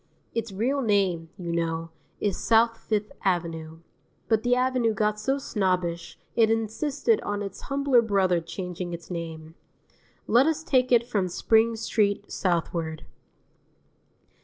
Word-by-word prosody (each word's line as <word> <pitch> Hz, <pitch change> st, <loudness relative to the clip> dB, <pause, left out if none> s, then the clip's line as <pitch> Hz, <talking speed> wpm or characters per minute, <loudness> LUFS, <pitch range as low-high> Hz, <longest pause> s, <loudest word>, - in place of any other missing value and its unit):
Its 230 Hz, -2 st, -2 dB
real 250 Hz, +8 st, 0 dB
name, 195 Hz, -7 st, +1 dB
you 175 Hz, -2 st, -4 dB
know, 165 Hz, -1 st, -2 dB, 0.3 s
is 205 Hz, -3 st, 0 dB
South 230 Hz, 0 st, +3 dB
Fifth 210 Hz, -1 st, -2 dB
Avenue; 165 Hz, -3 st, -2 dB, 0.5 s
but 220 Hz, -2 st, +2 dB
the 245 Hz, +1 st, +2 dB
Avenue 250 Hz, -3 st, +1 dB
got 210 Hz, +1 st, 0 dB
so 265 Hz, +6 st, 0 dB
snobbish 180 Hz, -8 st, -1 dB, 0.2 s
it 225 Hz, -2 st, +4 dB
insisted 270 Hz, -, 0 dB
on 205 Hz, 0 st, -3 dB
its 195 Hz, -1 st, -7 dB
humbler 275 Hz, -3 st, +3 dB
brother 190 Hz, -6 st, +2 dB
changing 180 Hz, +1 st, -5 dB
its 170 Hz, +1 st, -8 dB
name. 160 Hz, -2 st, -6 dB, 0.7 s
Let 245 Hz, +6 st, +4 dB
us 320 Hz, 0 st, 0 dB
take 255 Hz, -7 st, +2 dB
it 235 Hz, -1 st, +5 dB
from 205 Hz, -6 st, 0 dB
Spring 225 Hz, +5 st, +2 dB
Street 210 Hz, -2 st, 0 dB
southward. 165 Hz, -3 st, -1 dB
205 Hz, 135 wpm, -26 LUFS, 175-230 Hz, 0.7 s, it